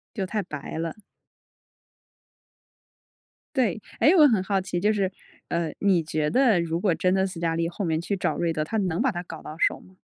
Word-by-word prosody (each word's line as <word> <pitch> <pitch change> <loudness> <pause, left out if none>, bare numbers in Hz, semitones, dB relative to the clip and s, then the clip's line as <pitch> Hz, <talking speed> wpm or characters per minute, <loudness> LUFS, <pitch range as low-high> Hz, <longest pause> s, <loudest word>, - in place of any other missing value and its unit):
就 195 -4 -2
太 210 +2 -2
白 150 -2 -6
了。 165 +4 -4 2.6
对。 225 -6 +1 0.2
诶， 310 - +6
我 305 -4 +8
很 220 -7 +2
好 195 0 0
奇， 180 -1 -3
就 210 +3 +3
是， 195 -3 0 0.4
呃， 170 -2 -1
你 190 -4 +3
觉 155 -1 -1
得 245 -8 +4
如 165 0 -2
果 185 -3 +2
真 180 +2 +1
的 190 0 +2
斯 185 -3 -7
嘉 165 -1 0
丽 165 0 0
后 175 +4 -4
面 160 -2 0
去 200 +4 -2
找 180 - -1
瑞 170 -1 0
德， 155 -1 -1
她 220 - -4
能 180 -4 0
把 265 +2 +3
他 175 -5 -4
搞 165 -3 -9
到 155 - -8
手 - - +2
吗？ 185 - -19
180 Hz, 220 characters per minute, -25 LUFS, 165-200 Hz, 2.6 s, 我